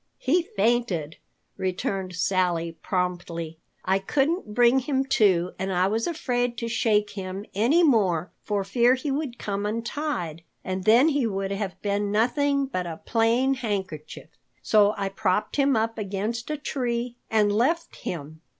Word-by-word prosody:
He 330 Hz, +7 st, +2 dB
fainted," 210 Hz, -, 0 dB, 0.4 s
returned 185 Hz, 0 st, -2 dB
Sally 180 Hz, -2 st, +1 dB
promptly. 175 Hz, -3 st, -3 dB, 0.3 s
"I 190 Hz, +1 st, +2 dB
couldn't 275 Hz, -, -1 dB
bring 245 Hz, +2 st, +5 dB
him 265 Hz, 0 st, 0 dB
to 185 Hz, -8 st, +3 dB
and 190 Hz, +1 st, -2 dB
I 180 Hz, 0 st, +2 dB
was 225 Hz, +2 st, 0 dB
afraid 245 Hz, -7 st, -1 dB
to 230 Hz, -, -3 dB
shake 210 Hz, -3 st, +1 dB
him 195 Hz, 0 st, -6 dB
any 250 Hz, -, +3 dB
more 190 Hz, -, +2 dB
for 205 Hz, -2 st, -1 dB
fear 240 Hz, +5 st, +3 dB
he 275 Hz, +2 st, -3 dB
would 270 Hz, -4 st, -3 dB
come 200 Hz, -1 st, -3 dB
untied, 215 Hz, -, -3 dB, 0.2 s
and 185 Hz, 0 st, -4 dB
then 240 Hz, +8 st, +6 dB
he 285 Hz, -5 st, +1 dB
would 195 Hz, -2 st, -2 dB
have 200 Hz, -1 st, -3 dB
been 205 Hz, 0 st, 0 dB
nothing 280 Hz, +6 st, +2 dB
but 185 Hz, -10 st, -3 dB
a 165 Hz, -1 st, -6 dB
plain 235 Hz, +4 st, +2 dB
handkerchief. 195 Hz, -, -4 dB, 0.3 s
So 210 Hz, -1 st, +4 dB
I 200 Hz, -1 st, -1 dB
propped 195 Hz, +3 st, -1 dB
him 275 Hz, -1 st, +3 dB
up 225 Hz, 0 st, 0 dB
against 215 Hz, +5 st, -3 dB
a 305 Hz, -, -1 dB
tree 245 Hz, -4 st, -2 dB
and 210 Hz, -2 st, +3 dB
left 320 Hz, +10 st, 0 dB
him. 155 Hz, -2 st, -6 dB
210 Hz, 150 wpm, -25 LUFS, 190-245 Hz, 0.4 s, then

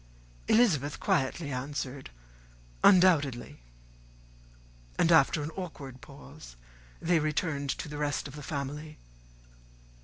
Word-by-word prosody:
Elizabeth 160 Hz, -, +3 dB
quietly 155 Hz, -4 st, 0 dB
answered 135 Hz, 0 st, -5 dB, 0.7 s
"undoubtedly;" 165 Hz, -, +4 dB, 1.4 s
and, 170 Hz, -, +3 dB
after 150 Hz, -1 st, +4 dB
an 150 Hz, -, -5 dB
awkward 145 Hz, -8 st, -8 dB
pause, 80 Hz, -, -13 dB, 0.4 s
they 170 Hz, 0 st, +2 dB
returned 150 Hz, -2 st, -1 dB
to -, -, -3 dB
the 150 Hz, 0 st, -7 dB
rest 145 Hz, -1 st, -1 dB
of 140 Hz, -, -11 dB
the 150 Hz, -, -8 dB
family. 150 Hz, +1 st, -5 dB
145 Hz, 100 wpm, -29 LUFS, 140-165 Hz, 1.4 s, undoubtedly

